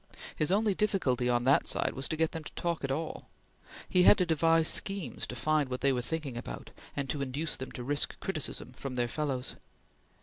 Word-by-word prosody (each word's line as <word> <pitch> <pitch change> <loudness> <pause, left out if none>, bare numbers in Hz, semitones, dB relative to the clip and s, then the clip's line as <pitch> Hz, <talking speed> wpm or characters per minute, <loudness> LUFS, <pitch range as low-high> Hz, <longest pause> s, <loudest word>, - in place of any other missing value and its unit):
His 155 +2 +1
only 210 +1 +3
difficulty 145 - +1
on 120 0 +2
that 135 +2 +4
side - - +2
was 135 - -1
to 160 - -2
get 160 0 +2
them 165 -1 -5
to - - -8
talk 170 -3 -2
at 135 - -1
all. 155 +4 -3 0.6
He 180 - +4
had 180 - +8
to 180 - +2
devise 165 0 +3
schemes 195 - -2
to 125 - -5
find 150 +2 +1
what 125 0 -3
they 140 -1 +3
were 125 - 0
thinking 145 -2 -4
about, - - -7 0.2
and 140 -2 -1
induce 140 +2 -2
them 130 - -7
to 125 - -5
risk 145 +3 0
criticism 155 -7 -3
from 130 0 -6
their 120 -1 +1
fellows. 135 -1 -2
145 Hz, 205 wpm, -31 LUFS, 130-165 Hz, 0.6 s, had